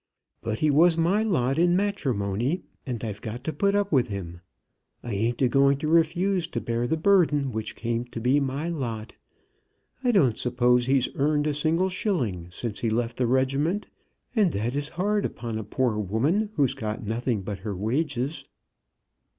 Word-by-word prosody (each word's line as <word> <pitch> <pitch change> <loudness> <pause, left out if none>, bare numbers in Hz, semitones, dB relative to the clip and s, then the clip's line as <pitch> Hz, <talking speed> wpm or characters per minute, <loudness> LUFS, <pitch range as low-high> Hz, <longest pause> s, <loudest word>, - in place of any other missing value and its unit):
But 110 -1 -2
he 155 +3 +2
was 165 +3 +5
my 175 +6 +2
lot 145 - +1
in 175 +1 +4
matrimony, 135 - -1 0.2
and 120 -3 -4
I've 105 -2 -5
got 115 +3 -6
to 160 - -3
put 200 +7 +1
up 205 0 +1
with 130 -5 +3
him. 90 -5 -6 0.6
I 120 - -4
ain't 115 +5 0
a - - +5
going 140 +2 +4
to 155 - -3
refuse 170 +3 +2
to - - -3
bear 120 +1 -1
the 160 - 0
burden 155 -7 +3
which 110 -1 -4
came 115 +1 -2
to 120 - -7
be 125 +5 +3
my 140 +3 -2
lot. 120 -9 -4 0.9
I 250 - +3
don't 140 - +3
suppose 125 0 +2
he's 135 -1 +2
earned 145 +1 +1
a 150 - +1
single 165 +5 +1
shilling 130 - -1
since 105 +3 -5
he 115 - 0
left 115 +1 -1
the 125 - +1
regiment, 135 - +1 0.5
and 205 -6 +4
that 110 +5 -1
is 145 +1 -2
hard 205 +4 0
upon 115 -2 -4
a - - -4
poor 120 -1 0
woman 140 - +1
who's 140 -4 +2
got 110 0 -4
nothing 115 -1 -1
but 100 0 -5
her 105 0 -4
wages." 135 - -2
130 Hz, 180 wpm, -26 LUFS, 115-165 Hz, 0.9 s, was